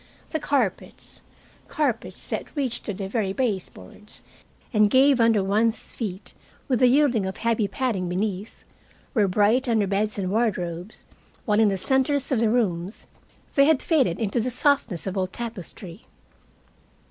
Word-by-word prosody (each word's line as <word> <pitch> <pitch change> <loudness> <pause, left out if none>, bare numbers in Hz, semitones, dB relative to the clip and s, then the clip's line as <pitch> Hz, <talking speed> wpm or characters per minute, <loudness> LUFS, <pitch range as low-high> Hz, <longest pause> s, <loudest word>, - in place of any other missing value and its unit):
The 315 - -1
carpets 275 -9 -2 0.5
carpets 280 -8 -2
that - - -5
reached 265 -5 -2
to 205 - -3
the 195 0 -4
very 195 -2 -1
baseboards 205 - -5 0.5
and 210 -1 +4
gave 265 +2 +5
under 225 -3 +4
one's 220 +4 0
feet 190 -5 -6 0.3
with 255 -4 +1
the 255 - +6
yielding 250 -6 +3
of 190 - -5
heavy 230 -2 0
padding 195 -4 -2
beneath 195 +3 -3 0.5
were 210 -5 +3
bright 215 +7 +2
under 220 -3 +2
beds 205 +2 -1
and 190 -2 -2
wardrobes, 185 -4 -2 0.4
while 210 -1 +2
in 220 -2 +5
the 195 - -1
centers 265 +6 0
of 255 - +2
the 225 -1 +2
rooms 200 -5 -1 0.5
they 275 - +5
had 310 -2 +3
faded 265 - +2
into 220 +2 -1
the 240 +3 0
softness 250 - +1
of 190 0 -3
old 185 -1 -1
tapestry. 200 -4 -7
220 Hz, 150 wpm, -24 LUFS, 195-250 Hz, 0.5 s, the